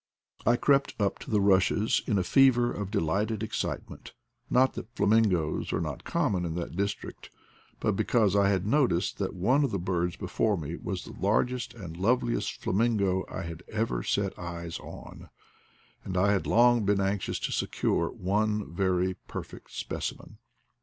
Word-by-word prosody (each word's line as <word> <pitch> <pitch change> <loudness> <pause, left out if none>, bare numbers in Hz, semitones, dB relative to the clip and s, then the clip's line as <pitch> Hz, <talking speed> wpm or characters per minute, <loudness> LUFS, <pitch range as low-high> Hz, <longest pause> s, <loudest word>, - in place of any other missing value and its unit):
I 120 - +6
crept 140 +2 +2
up 100 -2 0
to - - -10
the 105 - +2
rushes 100 +2 +3
in 105 - +2
a 95 - +2
fever 120 +2 +4
of 100 -2 -4
delighted 105 +3 0
excitement; 110 - -4 0.4
not 130 +1 +4
that - - -7
flamingoes 100 -9 +2
are - - 0
not - - -4
common 90 -3 0
in 80 -2 -3
that 85 -1 -4
dis 100 +2 0
trict, - - -11 0.5
but - - +1
because 105 -5 +2
I 100 -1 +4
had 95 -2 +1
noticed 115 - +1
that 100 -1 -2
one 125 +11 +3
of 140 - +1
the 100 - -1
birds 90 -1 -1
before 105 -3 0
me 80 0 -5
was 95 0 -5
the - - -10
largest 120 +4 0
and 90 -7 -8
loveliest 120 +6 +1
fla - - -1
mingo 100 -3 +2
I - - -5
had 85 0 -7
ever 110 - -1
set 100 +8 -1
eyes 85 -1 -5
on, - - -11 0.7
and 95 -1 -4
I 100 +3 +4
had 100 - 0
long 120 -1 +5
been 100 0 +2
anxious 100 0 -1
to - - -3
secure - - 0
one 105 +1 -1
very 95 0 +1
perfect - - -8
specimen. - - -5
100 Hz, 170 wpm, -28 LUFS, 90-110 Hz, 0.7 s, I